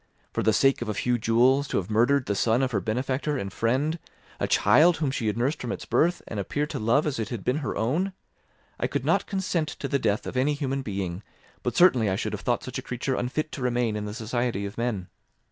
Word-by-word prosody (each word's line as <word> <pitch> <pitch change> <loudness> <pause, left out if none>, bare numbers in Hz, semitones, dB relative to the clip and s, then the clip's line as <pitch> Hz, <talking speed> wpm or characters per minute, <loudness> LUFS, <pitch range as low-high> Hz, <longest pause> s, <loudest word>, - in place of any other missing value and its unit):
For - - 0
the 110 - +3
sake 135 +4 +3
of 120 - -3
a 105 - -2
few 120 +3 0
jewels, 125 +5 +3
to - - -1
have 95 +2 -3
murdered 125 +5 +3
the 100 - 0
son 115 +5 +2
of 130 - 0
her 100 -4 0
benefactor 130 - -1
and 100 -5 -4
friend, 140 +8 0 0.4
a - - 0
child 170 +2 +5
whom 150 -4 0
she 120 -5 -2
had 105 - 0
nursed 135 +6 0
from 120 - -3
its - - -5
birth, 175 +2 +1
and 105 - -4
appeared 145 +9 -2
to - - -3
love 115 +7 +2
as 145 -6 -2
if 110 - -1
it - - -11
had 115 -6 -5
been 125 +3 +1
her 145 -3 -3
own! 165 - 0 0.7
I - - +1
could - - -3
not - - +2
consent 185 -5 -1
to 140 - -3
the 140 - 0
death 105 -3 0
of - - -6
any 140 +3 +2
human 135 -2 -2
being, 95 -6 -4 0.4
but - - -2
certainly 130 - +5
I 95 - +1
should - - -3
have - - -4
thought - - 0
such - - -5
a - - -5
creature 125 +2 -3
unfit 145 +6 -2
to 140 - -6
remain 120 -3 0
in 105 0 -3
the 105 0 -5
society 115 -2 -2
of 100 +2 -6
men. 115 -6 -2
125 Hz, 250 wpm, -26 LUFS, 110-140 Hz, 0.7 s, child